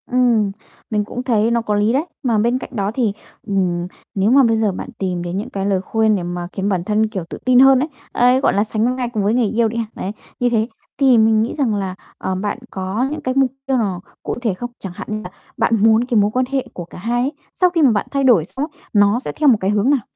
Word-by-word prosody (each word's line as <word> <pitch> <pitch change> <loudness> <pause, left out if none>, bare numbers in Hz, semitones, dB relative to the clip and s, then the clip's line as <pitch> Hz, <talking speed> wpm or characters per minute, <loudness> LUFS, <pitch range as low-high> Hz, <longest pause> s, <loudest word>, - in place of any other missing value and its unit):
Ừm, 240 -5 +2 0.4
mình 210 -2 0
cũng 245 +3 -5
thấy 230 -3 +2
nó 235 0 +2
có 210 -2 -1
lý 210 +3 +2
đấy, 285 +5 +1 0.2
mà 235 -4 +2
bên 235 +4 +2
cạnh - - -7
đó 200 -1 -1
thì, 230 -5 0 0.3
ừm, 180 -3 0 0.3
nếu 200 +3 +2
mà 275 +1 +6
bây 225 -2 +3
giờ 220 -2 +1
bạn 190 - -6
tìm 180 -2 -2
đến 175 +1 -4
những 205 - -4
cái 195 -1 -3
lời 195 -2 +1
khuyên 220 +1 +1
để 185 - -2
mà 175 0 -4
khiến 195 0 -1
bản 185 -4 0
thân, 215 +3 +1
kiểu, 200 -5 -4
tự - - -6
tin 255 -1 +5
hơn 270 0 +7
ấy, 300 +4 -1 0.2
ấy, 250 +2 +4
gọi 275 - +2
là, 200 - +2
sánh 220 +3 0
vai 245 -2 -2
cùng 210 -3 0
với 205 +2 +2
người 240 -2 +2
yêu 230 - +4
đi 225 +1 -4
ha, 230 - -1
đấy, 190 - -4 0.3
như 245 - +2
thế 225 -2 +1 0.3
thì 265 -3 +5
mình 220 0 +4
nghĩ 225 - -1
rằng 250 -7 +1
là, 190 -2 -3 0.2
ờ, 190 - -3
bạn 200 +3 -2
có 195 +7 -2
những 305 0 -4
cái 255 -3 -1
mục 265 -1 +2
tiêu 270 -1 +1
nào 195 -6 -1 0.2
cụ - - -3
thể 225 -5 0
không? 240 +6 -6
Chẳng 190 -3 -7
hạn - - -7
như 215 0 -2
là 180 - -7 0.3
bạn 230 0 +2
muốn 220 +2 +4
cái 245 -2 0
mối 205 +1 +2
quan 255 +3 +1
hệ 270 -2 0
của 175 - -6
cả - - -13
hai 235 +6 -1
ấy, 265 +3 0 0.2
sau 365 - +4
khi 345 -2 0
mà 275 -5 +6
bạn 205 -2 -1
thay 275 -1 0
đổi 230 -12 +5
xong 270 - -4
ấy - - -28
nó 205 +2 +4
sẽ - - -5
theo 300 -2 +3
một 235 - +5
cái 190 - 0
hướng 210 +4 +2
nào? 285 -3 +3
220 Hz, 280 wpm, -19 LUFS, 200-250 Hz, 0.4 s, hơn